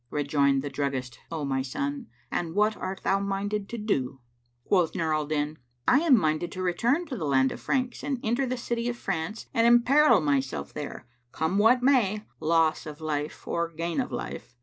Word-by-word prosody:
Rejoined 140 -1 +1
the 145 - -3
druggist, 130 -3 -3
"O 160 -3 -3
my 135 -1 0
son, 280 - -3 0.2
and 170 -1 -2
what 210 +1 +3
art 190 0 -5
thou 195 - +2
minded 200 +1 -2
to 235 - -5
do?" 135 - -1 0.5
Quoth 180 -5 +2
Nur 160 -2 0
al 155 -1 0
Din, 150 0 -2 0.3
"I 265 - +6
am 305 -6 +5
minded 155 -1 0
to 185 - -4
return 235 - +1
to 290 -5 -5
the 190 - -4
land 135 -1 +3
of - - -6
the - - -4
Franks[FN#549] 255 -2 0
and 275 -3 -1
enter 240 +4 +1
the 255 +1 -2
city 235 0 -2
of 240 - -4
France 165 +1 -3
and 230 0 +4
emperil 250 +5 +6
myself 140 -4 -1
there; 145 -3 -6 0.3
come 160 +5 0
what 245 +4 +5
may, 215 -6 +3 0.2
loss 160 0 +2
of 150 -1 -8
life 150 -1 -4
or 170 0 -1
gain 170 - -2
of 250 - -5
life." 125 - -6
180 Hz, 195 wpm, -27 LUFS, 150-235 Hz, 0.5 s, I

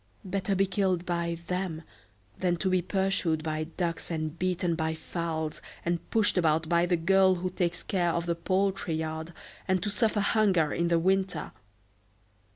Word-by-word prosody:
Better 195 +1 -1
be 195 +1 +3
killed 185 -2 0
by 170 -1 -1
them 180 -3 -3 0.6
than 180 -1 +2
to 185 +2 0
be 185 -1 +3
pursued 185 -4 0
by 155 0 -2
ducks, 170 +1 -3
and 155 -1 -3
beaten 180 -1 0
by 160 -1 -1
fowls, 160 -2 -3 0.2
and 170 0 -2
pushed 210 -4 +3
about 160 -1 +2
by 170 +1 +3
the 175 -1 +2
girl 190 +2 +4
who 180 +1 -3
takes 180 -1 -1
care 175 -3 +1
of 170 0 -1
the 170 - +1
poultry 185 0 0
yard, 160 +1 -4 0.4
and 185 -1 +1
to 210 - -1
suffer 215 0 +1
hunger 195 -8 +3
in 170 -1 +1
winter!" 190 -3 +1
175 Hz, 160 wpm, -28 LUFS, 165-190 Hz, 0.6 s, girl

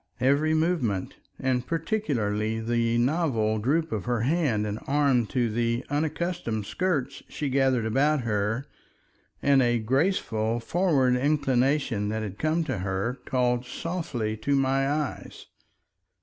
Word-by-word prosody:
Every 140 +5 +3
movement, 155 - 0 0.2
and 130 -1 0
particularly 115 - -1
the 115 +1 0
novel 120 -5 +1
droop 155 +8 0
of 105 -4 -3
her 120 -2 0
hand 130 -6 +1
and 105 +1 -3
arm 140 -5 +2
to 125 -1 0
the 115 +2 -1
unaccustomed 150 - -2
skirts 145 - -1
she 145 - -3
gathered 130 -3 +2
about 140 +6 +2
her, 110 +2 -1 0.8
and 140 -1 +5
a 120 -1 +2
graceful 115 - 0
forward 135 -2 +2
inclination 135 -5 +1
that 110 0 -2
had 100 -1 -6
come 155 +2 +1
to 130 -10 -3
her, 95 +7 -2
called 125 -2 +1
softly 135 -12 -3
to 140 +6 0
my 135 0 +2
eyes. 150 -1 -4
130 Hz, 130 wpm, -26 LUFS, 110-150 Hz, 0.8 s, and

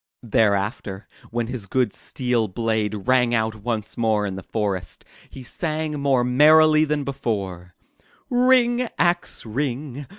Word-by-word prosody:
Thereafter, 100 -2 0 0.2
when 120 0 -2
his 115 -4 -5
good 125 -1 0
steel 125 -3 -1
blade 110 0 -2
rang 125 -2 +3
out 110 -1 0
once 110 0 -4
more 110 -2 +1
in 95 -2 -4
the 95 - -6
forest, 100 -5 -4 0.2
he 130 - -10
sang 155 +2 -3
more 135 -3 +2
merrily 155 +4 +5
than 150 -1 -1
before: 95 -10 -4 0.5
'*Ring, 245 -1 +3
axe, 175 -6 0
ring! 135 +3 -4
120 Hz, 130 wpm, -23 LUFS, 105-145 Hz, 0.5 s, merrily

